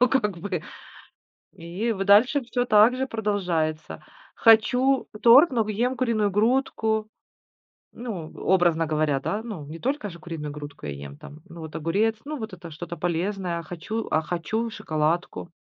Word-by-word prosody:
ну, 250 - +5
как 210 -8 0
бы. 180 -2 -4 0.9
И 180 +8 -3
в 195 -2 -3
дальше 215 +8 +5
всё 245 +1 -1
так 215 +1 +5
же 265 +1 -1
продолжается. 175 - -2 0.3
Хочу 250 +4 +4 0.2
торт, 265 +8 +8
но 230 -5 0
ем 240 +5 0
куриную 225 -5 +1
грудку. 220 0 +1 0.9
Ну, 205 -10 -6
образно 175 -3 +3
говоря, 155 -2 +1
да. 205 +10 -3
Ну, 205 -11 -7
не 155 +3 -9
только 260 - -2
же 170 - -11
куриную 155 -3 -6
грудку 145 - -9
я - - -4
ем, 70 0 -10
там, 150 - -12
ну, 170 0 -10
вот 160 -1 -9
огурец, 200 +8 +1
ну, 300 +1 -4
вот 220 -4 -6
это 175 -2 -9
что-то 170 +2 -7
полезное, 175 +1 -2
а - - -7
хочу 180 +7 -5
а 155 - +3
хочу 180 +8 -2
шоколадку. 160 -1 -2
200 Hz, 160 wpm, -25 LUFS, 165-230 Hz, 0.9 s, торт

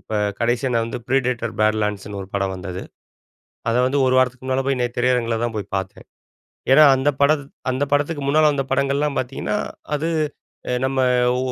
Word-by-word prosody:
இப்ப - - -12 0.3
கடைசியா 120 +2 +1
நான் 115 -1 +2
வந்து 115 - -5
ப்ரிடேட்டர் 125 -3 0
பேட்லேண்ட்ஸ்ன்னு 105 -2 0
ஒரு 95 - -11
படம் 95 -1 0
வந்தது. 90 0 -6 0.9
அத 115 - +1
வந்து, 140 +2 0
ஒரு 130 - +3
வாரத்துக்கு 130 0 0
முன்னால 130 0 0
போய் 135 -2 +1
நே 120 - +2
திரையரங்கில 120 -2 +1
தான் 115 -2 -2
போய் 100 -1 -6
பாத்தேன். 95 -1 -5 0.7
ஏன்னா, 155 +2 +8
அந்த 130 +2 +1
படத் 145 0 +3 0.3
அந்த 130 +3 0
படத்துக்கு 145 +1 +1
முன்னால 155 +1 +4
வந்த 135 -1 -1
படங்கள்லாம் 140 +1 +1
பாத்தீங்கன்னா, 120 -4 -3 0.4
அது 160 +3 -2 0.6
எ - - +1
நம்ம 130 0 0 0.4
ஓ - - -1
125 Hz, 170 wpm, -21 LUFS, 110-140 Hz, 0.9 s, ஏன்னா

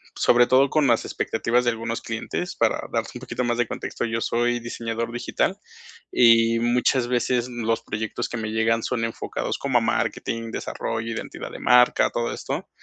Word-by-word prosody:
sobre 120 0 +5
todo 130 +2 +4
con 155 -2 +2
las 120 -3 +2
expectativas 120 +2 0
de 120 - +2
algunos 115 0 -4
clientes, 115 +11 -4
para 115 -1 +1
darte - - -1
un - - -7
poquito 125 - -3
más 120 0 0
de 120 - +2
contexto. - - -4
Yo 115 0 -2
soy 120 +1 +1
diseñador 115 0 -4
digital, 120 +1 -1 0.5
y 115 -1 +5
muchas 120 +1 +2
veces 125 0 0
los 115 -2 -1
proyectos 110 +2 -4
que 120 - -4
me 110 -1 -3
llegan 110 +1 +1
son 115 -3 -1
enfocados 115 - -3
como - - +2
a - - -5
marketing, 115 0 -1
desarrollo, 115 0 -4
identidad - - -6
de - - -8
marca, 125 0 +4
todo 120 0 -1
esto. - - -5
115 Hz, 180 wpm, -24 LUFS, 115-120 Hz, 0.5 s, sobre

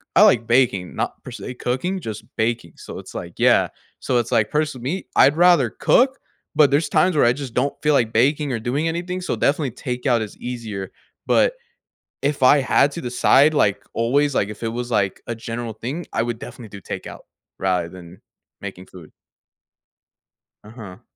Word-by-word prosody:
I - - +7
like 115 -2 +5
baking, 115 -7 +2
not - - -3
per - - -9
se 125 - -7
cooking, 130 +11 -2
just 110 -6 -6
baking. 115 -7 -1
So - - -9
it's - - -12
like, - - -7
yeah, - - +4 0.3
so 125 - 0
it's 120 -1 0
like, 105 -1 +2
person 150 -4 -1
me, 165 +10 -3
I'd 140 +3 +5
rather 175 -8 +5
cook, 260 - +2 0.3
but 150 -2 +5
there's 145 +4 +1
times 185 -2 +3
where 150 - +4
I 120 - +5
just 130 -3 -7
don't 140 +3 0
feel 150 0 +3
like 120 -5 +2
baking 140 +5 +2
or 120 - -2
doing 135 +8 -1
anything, 180 +2 -3
so, 180 - -2
definitely 145 -2 +1
takeout 125 0 -1
is 110 - -6
easier, 110 -6 -6 0.3
but - - +3 0.7
if 140 -1 -1
I 140 +3 +7
had 140 +2 +3
to 170 - -5
decide, 135 +4 +4
like 100 -7 +2
always, 140 +4 +1
like 100 - +1
if 105 - -9
it - - 0
was 120 +1 -5
like 100 -3 0
a 120 - -2
general 115 0 -5
thing, 135 +10 -5
I - - +1
would 120 -1 -3
definitely 115 -3 -10
do 100 -1 -10
takeout, - - -7 0.4
rather 90 -3 0
than 90 0 -13 0.4
making 95 -2 -8
food. 85 -5 -14 1.5
Uh-huh. 105 -4 -11
125 Hz, 185 wpm, -21 LUFS, 110-145 Hz, 1.5 s, I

